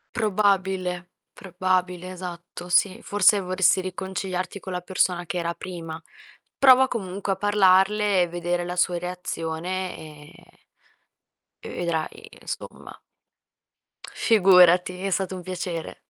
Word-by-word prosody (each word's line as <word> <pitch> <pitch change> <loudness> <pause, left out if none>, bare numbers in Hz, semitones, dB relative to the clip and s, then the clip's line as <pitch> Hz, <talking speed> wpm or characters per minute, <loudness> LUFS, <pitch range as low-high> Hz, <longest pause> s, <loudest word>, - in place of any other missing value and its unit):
Probabile, 190 -4 0 0.2
probabile, 185 -1 -2
esatto, 175 -1 -8
sì, 185 +2 +2
forse 205 0 +3
vorresti 185 0 +2
riconciliarti 185 +1 -4
con 190 - -7
la 180 - -3
persona 180 -1 0
che 180 - -4
era 170 0 -2
prima. 165 -3 -7 0.6
Prova 265 -1 +7
comunque 195 -3 -3
a - - -4
parlarle 200 0 +3
e 175 - +2
vedere 175 0 -2
la 180 +1 -5
sua 180 -1 +1
reazione, 180 +1 -4
e 150 -2 -13 1.3
e - - -7
vedrai 170 -2 -4
insomma. - - -8 1.3
Figurati, 180 -3 +5
è 195 - -1
stato 190 0 -1
un 180 - -7
piacere. 175 -2 -5
185 Hz, 115 wpm, -24 LUFS, 175-190 Hz, 1.3 s, Prova